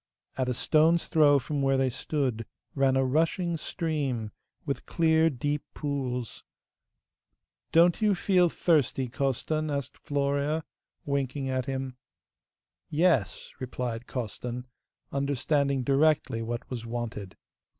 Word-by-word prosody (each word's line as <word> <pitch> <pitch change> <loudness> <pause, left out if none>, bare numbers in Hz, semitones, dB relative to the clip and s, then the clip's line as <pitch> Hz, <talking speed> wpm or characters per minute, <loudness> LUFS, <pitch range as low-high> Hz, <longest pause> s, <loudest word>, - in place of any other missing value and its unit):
At 130 -1 -1
a 125 - -1
stone's 160 +5 +3
throw 150 -3 +5
from 140 +2 -2
where 135 0 +3
they 130 -1 +2
stood 125 -4 -2 0.3
ran 135 -1 +2
a 135 0 +3
rushing 165 +5 +1
stream, 145 - -2 0.3
with 140 -2 -3
clear 160 -1 +3
deep 145 +2 -2
pools. 130 -5 -3 1.3
'Don't 170 +4 +5
you 210 -2 +4
feel 180 -1 +3
thirsty, 145 -6 +1
Costan?' 140 +4 -1
asked 140 -2 -4
Florea, 145 +2 0 0.4
winking 140 -1 -1
at 130 -1 -1
him. 130 -1 -4 0.9
'Yes,' 150 - +1
replied 125 -2 -4
Costan, 125 +1 -4 0.5
understanding 140 0 0
directly 140 -3 +2
what 120 +1 -4
was 120 -3 -4
wanted. 115 -5 -5
140 Hz, 115 wpm, -28 LUFS, 125-155 Hz, 1.3 s, throw